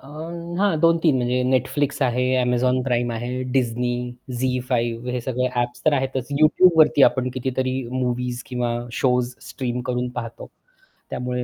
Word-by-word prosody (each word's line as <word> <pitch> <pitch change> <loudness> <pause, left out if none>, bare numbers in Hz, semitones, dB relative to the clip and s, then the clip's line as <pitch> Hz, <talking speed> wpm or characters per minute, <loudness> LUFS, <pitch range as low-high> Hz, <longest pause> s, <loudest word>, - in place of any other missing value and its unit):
अ, 130 - -16 0.5
हां, 195 -5 +2
2-3 165 -3 +4
म्हणजे 125 0 0
Netflix 140 +3 0
आहे, 125 -1 +1 0.2
Amazon 125 +1 +2
Prime 120 -1 +1
आहे, 115 +1 -4 0.2
Disney, 125 -1 0 0.5
ZEE5 125 -2 -1
हे 125 - -2
सगळे 125 +1 -1
ॲप्स 120 0 -2
तर 155 - +5
आहेतच 130 -1 -2
YouTubeवरती 155 -2 +5
आपण 130 -1 +4
कितीतरी 130 0 -1 0.2
मूवीज 125 -1 -2
किंवा 125 -2 -2 0.2
शोज 125 0 +1 0.2
स्ट्रीम 125 -2 -3
करून 125 0 -1
पाहतो 115 -1 -7 0.6
त्यामुळे 125 0 -3
125 Hz, 135 wpm, -22 LUFS, 120-130 Hz, 0.6 s, तर